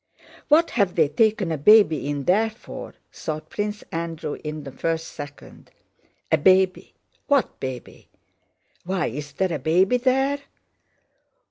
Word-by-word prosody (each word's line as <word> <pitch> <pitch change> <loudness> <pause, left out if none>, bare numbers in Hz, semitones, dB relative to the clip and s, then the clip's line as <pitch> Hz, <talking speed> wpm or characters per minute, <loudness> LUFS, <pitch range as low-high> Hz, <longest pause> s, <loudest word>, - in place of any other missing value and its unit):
"What 330 +3 +4
have 200 -6 +1
they 155 -4 +3
taken 210 -2 +1
a 155 - -2
baby 160 -4 +5
in 145 -1 -2
there 210 +8 +3
for?" 220 - -10 0.2
thought 155 -1 -6
Prince 210 0 -3
Andrew 165 -2 -4
in 150 -1 -5
the 135 - -8
first 165 +3 -2
second. 145 -1 -11 0.6
"A - - +4
baby? 185 +3 +3 0.3
What 280 -3 +1
baby...? 130 -2 -7 0.7
Why 185 0 -1
is 140 +4 -6
there 185 +3 0
a 155 - -2
baby 180 - +3
there? 270 +3 +1
175 Hz, 135 wpm, -23 LUFS, 150-215 Hz, 0.7 s, baby